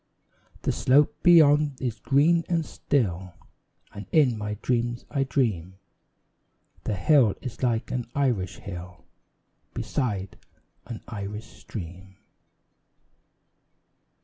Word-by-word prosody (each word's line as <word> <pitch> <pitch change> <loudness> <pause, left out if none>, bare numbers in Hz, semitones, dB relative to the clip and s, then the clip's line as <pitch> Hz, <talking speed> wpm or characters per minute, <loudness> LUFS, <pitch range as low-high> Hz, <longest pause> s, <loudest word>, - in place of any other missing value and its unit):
The - - +1
slope 145 +3 +3
beyond 150 -5 +5
is 120 -4 -3
green 160 +5 +3
and 165 -2 +1
still, 95 - -2 0.6
And 100 -1 -8
in 140 -7 +4
my 105 -1 -4
dreams 120 -1 -1
I 140 -2 0
dream 105 - -1 1.1
The 105 - -1
hill 110 - +4
is 125 -4 -8
like 120 -3 0
an 125 -2 -3
Irish 120 -10 0
hill 90 -1 -9 0.7
Beside 100 -8 -3 0.5
an 115 -2 -7
Irish 105 0 -6
stream. 95 -1 -10
120 Hz, 100 wpm, -26 LUFS, 100-140 Hz, 1.1 s, beyond